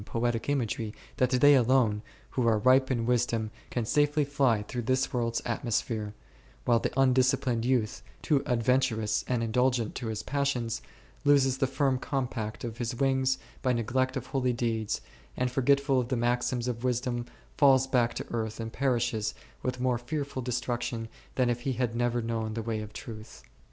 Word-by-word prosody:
55 105 Hz, -, -14 dB
poetic 120 Hz, +1 st, 0 dB
imagery 115 Hz, -5 st, -1 dB, 0.2 s
that 125 Hz, -, +3 dB
they 135 Hz, +3 st, +6 dB
alone, 125 Hz, -5 st, +3 dB, 0.3 s
who 125 Hz, -3 st, 0 dB
are 110 Hz, -2 st, +4 dB
ripe 130 Hz, +4 st, +4 dB
in 120 Hz, -3 st, 0 dB
wis 120 Hz, 0 st, +3 dB
dom, 110 Hz, -2 st, -2 dB, 0.2 s
can 120 Hz, -2 st, -2 dB
safely 145 Hz, +4 st, +2 dB
fly 135 Hz, -6 st, +2 dB
through 125 Hz, +3 st, -4 dB
this 130 Hz, +3 st, 0 dB
world's 115 Hz, -2 st, 0 dB
atmosphere, 110 Hz, -3 st, -2 dB, 0.5 s
while 120 Hz, -1 st, +4 dB
the -, -, -1 dB
undisciplined 130 Hz, -2 st, +3 dB
youth, 120 Hz, -4 st, 0 dB, 0.2 s
too 145 Hz, -3 st, +2 dB
adventurous 115 Hz, -3 st, +1 dB
and 125 Hz, -2 st, 0 dB
indulgent 120 Hz, 0 st, +1 dB
to 120 Hz, -, -5 dB
his 110 Hz, -1 st, -3 dB
passions, 125 Hz, -5 st, -1 dB, 0.4 s
loses 135 Hz, -2 st, +4 dB
the 135 Hz, -, +2 dB
firm 135 Hz, -1 st, +1 dB
compact 125 Hz, -6 st, -3 dB
of 115 Hz, -1 st, -5 dB
his 120 Hz, 0 st, -2 dB
wings 130 Hz, 0 st, +2 dB, 0.2 s
by 130 Hz, -2 st, +2 dB
neglect 125 Hz, +3 st, 0 dB
of -, -, -5 dB
holy 130 Hz, -2 st, 0 dB
deeds, 115 Hz, -3 st, -1 dB, 0.4 s
and 125 Hz, 0 st, 0 dB
forgetful 140 Hz, +1 st, +3 dB
of 125 Hz, -, -1 dB
the 130 Hz, 0 st, -1 dB
maxims 120 Hz, +1 st, 0 dB
of 120 Hz, -1 st, -3 dB
wisdom 125 Hz, -1 st, -1 dB, 0.3 s
falls 135 Hz, -2 st, +5 dB
back 125 Hz, -3 st, +1 dB
to -, -, -4 dB
earth 110 Hz, -1 st, -3 dB
and 115 Hz, 0 st, -5 dB
perishes 120 Hz, -5 st, 0 dB, 0.3 s
with 125 Hz, 0 st, -3 dB
more 125 Hz, -1 st, +1 dB
fearful 140 Hz, +1 st, -4 dB
destruction 120 Hz, -1 st, -2 dB, 0.3 s
than 130 Hz, -1 st, +2 dB
if 120 Hz, 0 st, -1 dB
he 135 Hz, +1 st, -1 dB
had 120 Hz, -1 st, -1 dB
never 120 Hz, 0 st, 0 dB
known 110 Hz, -1 st, -2 dB
the 115 Hz, -, -3 dB
way 110 Hz, -1 st, -2 dB
of 105 Hz, 0 st, -8 dB
truth. 110 Hz, 0 st, -9 dB
120 Hz, 175 wpm, -29 LUFS, 115-130 Hz, 0.5 s, they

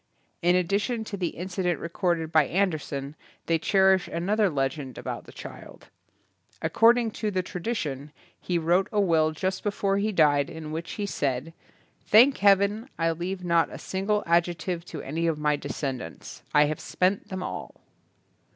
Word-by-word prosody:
In 175 Hz, +1 st, +4 dB
addition 200 Hz, +6 st, 0 dB
to 215 Hz, -, -6 dB
the 180 Hz, -3 st, -1 dB
incident 180 Hz, 0 st, -2 dB
recorded 170 Hz, -1 st, -1 dB
by 155 Hz, -4 st, +4 dB
Andersen 155 Hz, -6 st, -1 dB, 0.3 s
they 165 Hz, -1 st, +1 dB
cherish 190 Hz, +1 st, +3 dB
an 170 Hz, +4 st, -3 dB
other 210 Hz, -2 st, +3 dB
legend 135 Hz, -2 st, -2 dB
about -, -, -5 dB
the -, -, -13 dB
child. -, -, -11 dB, 0.7 s
Accord 230 Hz, +2 st, +4 dB
ing 235 Hz, -2 st, 0 dB
to 215 Hz, 0 st, -2 dB
the 185 Hz, -2 st, -1 dB
tradition, 155 Hz, -, -4 dB, 0.3 s
he 180 Hz, -, -1 dB
wrote 175 Hz, +4 st, +2 dB
a 210 Hz, -, +1 dB
will 165 Hz, -5 st, +3 dB
just 185 Hz, +4 st, -2 dB
before 200 Hz, -1 st, 0 dB
he 215 Hz, +2 st, 0 dB
died 145 Hz, -6 st, +3 dB
in 160 Hz, -1 st, -7 dB
which 165 Hz, +2 st, -5 dB
he 205 Hz, -, -3 dB
said, 140 Hz, -4 st, -2 dB, 0.5 s
"Thank 250 Hz, +6 st, +6 dB
heaven 200 Hz, +4 st, +3 dB
I 165 Hz, 0 st, +1 dB
leave 180 Hz, +3 st, -4 dB
not 170 Hz, -1 st, +3 dB
a -, -, -7 dB
single 200 Hz, +2 st, -1 dB
ad 170 Hz, 0 st, +4 dB
jective 175 Hz, 0 st, -4 dB
to -, -, -7 dB
any 165 Hz, +4 st, -2 dB
of 160 Hz, -2 st, 0 dB
my 150 Hz, 0 st, +1 dB
descendants. 135 Hz, -3 st, -6 dB
I 150 Hz, 0 st, +5 dB
have 150 Hz, 0 st, -2 dB
spent 185 Hz, +2 st, 0 dB
them 185 Hz, -1 st, -4 dB
all." -, -, -6 dB
175 Hz, 170 wpm, -26 LUFS, 155-195 Hz, 0.7 s, Thank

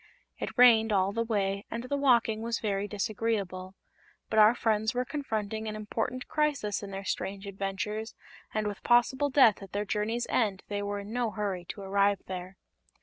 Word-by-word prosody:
It -, -, -5 dB
rained 230 Hz, -3 st, +7 dB
all 195 Hz, -1 st, +2 dB
the 230 Hz, +1 st, 0 dB
way 200 Hz, -3 st, -1 dB
and 230 Hz, +1 st, -4 dB
the 255 Hz, +3 st, -2 dB
walking 235 Hz, -6 st, +3 dB
was 230 Hz, 0 st, -1 dB
very 200 Hz, -1 st, -1 dB
disagreeable; 200 Hz, -3 st, -2 dB, 0.6 s
but 220 Hz, -, +3 dB
our 215 Hz, +3 st, +7 dB
friends 220 Hz, 0 st, +1 dB
were 250 Hz, +1 st, 0 dB
confronting 220 Hz, -6 st, -3 dB
an 215 Hz, -, -4 dB
important 225 Hz, +4 st, -3 dB
crisis 290 Hz, -9 st, 0 dB
in 200 Hz, -, -7 dB
their 195 Hz, 0 st, -6 dB
strange 195 Hz, +1 st, -3 dB
adventures 200 Hz, +3 st, -4 dB, 0.4 s
and 215 Hz, -1 st, -1 dB
with 205 Hz, -1 st, -4 dB
possible 260 Hz, +4 st, +3 dB
death 255 Hz, -8 st, +5 dB
at 195 Hz, -1 st, -11 dB
their 205 Hz, +1 st, -1 dB
journey's 220 Hz, +4 st, -1 dB
end 205 Hz, -5 st, 0 dB
they 205 Hz, 0 st, -2 dB
were 205 Hz, 0 st, -3 dB
in 205 Hz, +2 st, -8 dB
no 245 Hz, -2 st, 0 dB
hurry 200 Hz, -4 st, -3 dB
to 200 Hz, -, -7 dB
arrive 200 Hz, 0 st, +2 dB
there. 185 Hz, +1 st, -7 dB
210 Hz, 180 wpm, -29 LUFS, 200-230 Hz, 0.6 s, rained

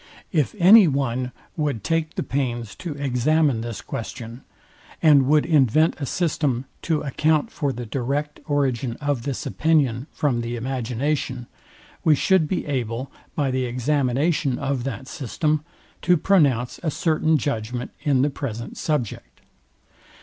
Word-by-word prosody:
If 155 Hz, -, +1 dB
any 200 Hz, +2 st, +8 dB
one 130 Hz, -3 st, -1 dB, 0.2 s
would 145 Hz, -, -2 dB
take 165 Hz, +4 st, -1 dB
the -, -, -1 dB
pains 120 Hz, -5 st, -2 dB
to 170 Hz, -4 st, -5 dB
examine 140 Hz, -1 st, +1 dB
this 115 Hz, -3 st, -5 dB
question, 115 Hz, +2 st, -7 dB, 0.6 s
and 145 Hz, -5 st, +5 dB
would 150 Hz, +1 st, +4 dB
invent 155 Hz, 0 st, +3 dB
a 140 Hz, -, -2 dB
system, 145 Hz, -7 st, 0 dB, 0.2 s
to 160 Hz, -3 st, 0 dB
account 150 Hz, +2 st, +1 dB
for 145 Hz, -4 st, -1 dB
the 125 Hz, -1 st, -6 dB
direct 140 Hz, +5 st, -2 dB
origin 135 Hz, -5 st, 0 dB
of 145 Hz, -3 st, -2 dB
this 140 Hz, +4 st, -4 dB
opinion 140 Hz, -4 st, +1 dB
from 130 Hz, -6 st, 0 dB
the 120 Hz, +1 st, -3 dB
imagination, 125 Hz, +1 st, -2 dB, 0.6 s
we 155 Hz, -, +5 dB
should 180 Hz, +2 st, +3 dB
be 185 Hz, -, -2 dB
able, 125 Hz, -2 st, -3 dB, 0.2 s
by 140 Hz, -3 st, 0 dB
the 130 Hz, 0 st, 0 dB
examination 135 Hz, +2 st, 0 dB
of 135 Hz, -3 st, -2 dB
that 130 Hz, -1 st, -5 dB
system, 150 Hz, +3 st, -1 dB, 0.4 s
to 180 Hz, 0 st, +4 dB
pronounce 140 Hz, -10 st, +2 dB
a 165 Hz, -, -1 dB
certain 155 Hz, 0 st, +2 dB
judgment 125 Hz, -3 st, -3 dB
in 140 Hz, -4 st, +2 dB
the 145 Hz, -, +1 dB
present 115 Hz, -5 st, -5 dB
subject. 145 Hz, -9 st, -3 dB
140 Hz, 140 wpm, -23 LUFS, 125-155 Hz, 0.6 s, any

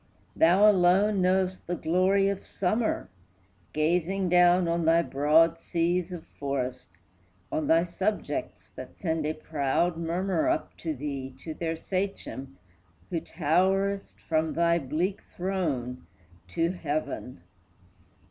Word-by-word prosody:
Thou 185 Hz, +6 st, +5 dB
alone 195 Hz, +1 st, +4 dB
know'st 185 Hz, 0 st, +1 dB
the 175 Hz, -, -1 dB
glory 185 Hz, +4 st, +2 dB
of 200 Hz, -1 st, -2 dB
summer, 215 Hz, +5 st, -1 dB, 0.6 s
Gazing 180 Hz, +4 st, 0 dB
down 180 Hz, 0 st, +5 dB
on 170 Hz, 0 st, 0 dB
thy 165 Hz, +1 st, +4 dB
broad 160 Hz, +4 st, +3 dB
seas 175 Hz, +2 st, -1 dB
of 175 Hz, -3 st, -7 dB
forest, 130 Hz, -3 st, -4 dB, 0.6 s
On 155 Hz, -, -1 dB
thy 165 Hz, +1 st, +4 dB
subjects 190 Hz, +4 st, -3 dB
that -, -, -9 dB
send 160 Hz, -4 st, -1 dB
a 155 Hz, -, -1 dB
proud 155 Hz, +3 st, 0 dB
murmur 170 Hz, +1 st, 0 dB
Up -, -, -1 dB
to 160 Hz, -2 st, -3 dB
thee, 135 Hz, -1 st, -5 dB
to 160 Hz, -, -5 dB
their 165 Hz, 0 st, -3 dB
sachem, 185 Hz, -, -4 dB, 0.5 s
who 165 Hz, -, 0 dB
towerest 190 Hz, +5 st, 0 dB
From 160 Hz, -1 st, +1 dB
thy 170 Hz, 0 st, +2 dB
bleak 160 Hz, +7 st, -2 dB
throne 150 Hz, -10 st, -2 dB, 0.4 s
to 165 Hz, -, 0 dB
heaven. 145 Hz, -, -4 dB
170 Hz, 120 wpm, -27 LUFS, 155-185 Hz, 0.6 s, Thou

